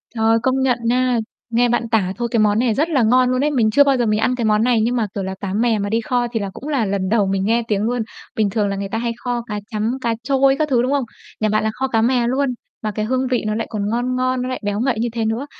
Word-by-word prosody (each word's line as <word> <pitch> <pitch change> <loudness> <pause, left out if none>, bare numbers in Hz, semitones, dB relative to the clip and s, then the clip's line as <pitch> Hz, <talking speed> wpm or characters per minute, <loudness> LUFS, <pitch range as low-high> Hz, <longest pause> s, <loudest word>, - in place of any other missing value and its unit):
Trời, 225 0 +3
công 265 0 +1
nhận 255 -2 +2
nha, 250 0 +2 0.3
nghe 240 +1 +2
bạn 235 -1 0
tả 195 -4 +1
thôi 240 0 -1
cái 230 - +2
món 210 0 +3
này 240 -3 +2
rất 310 +7 0
là 270 -7 +2
ngon 250 +3 +4
luôn 255 +2 +1
ấy. 300 - +1
Mình 230 -6 +2
chưa 285 +5 +6
bao 275 -2 +2
giờ 240 - +1
mình 215 0 +1
ăn 250 +3 +1
cái 235 -3 -2
món 215 +1 +3
này 240 -2 +3
nhưng 245 +2 0
mà, 225 -3 0
kiểu 195 - -2
là, 190 0 -4
cá 195 -1 -3
mè 225 0 +1
mà 200 0 -2
đi 225 +1 +1
kho 245 +1 0
thì 225 - -1
là 200 -1 -3
cũng 285 - -9
là 265 -7 +1
lần 195 -1 -1
đầu 210 -3 +2
mình 195 0 0
nghe 230 +2 +2
tiếng 210 -1 0
luôn. 240 +1 0 0.3
Bình 215 -3 +1
thường 205 0 0
là 200 - -2
người 195 0 -4
ta 225 - -2
hay 235 0 -1
kho 245 -1 -2
cá 210 -2 -3
trắm, 220 +4 -1
cá 230 -1 0
trôi 270 0 +3
các 305 -1 +1
thứ, 245 -3 +3
đúng 255 +2 0
không? 280 -2 +1 0.4
Nhà 215 -1 +1
bạn 215 +1 +1
là 220 - 0
kho 265 0 -2
cá 225 -3 +1
mè 240 0 +2
luôn, 270 +2 +1 0.3
mà 215 - -1
cái 215 +1 -2
hương 260 +2 0
vị 250 -3 0
nó 215 - -1
lại 225 - -2
còn 205 -1 -2
ngon 245 +2 -1
ngon, 255 0 0
nó 255 - -3
lại 255 - -3
béo 205 0 -1
ngậy 245 -2 0
như 235 +1 0
thế 225 -2 -1
nữa. 225 +6 -1
235 Hz, 315 wpm, -20 LUFS, 215-255 Hz, 0.4 s, chưa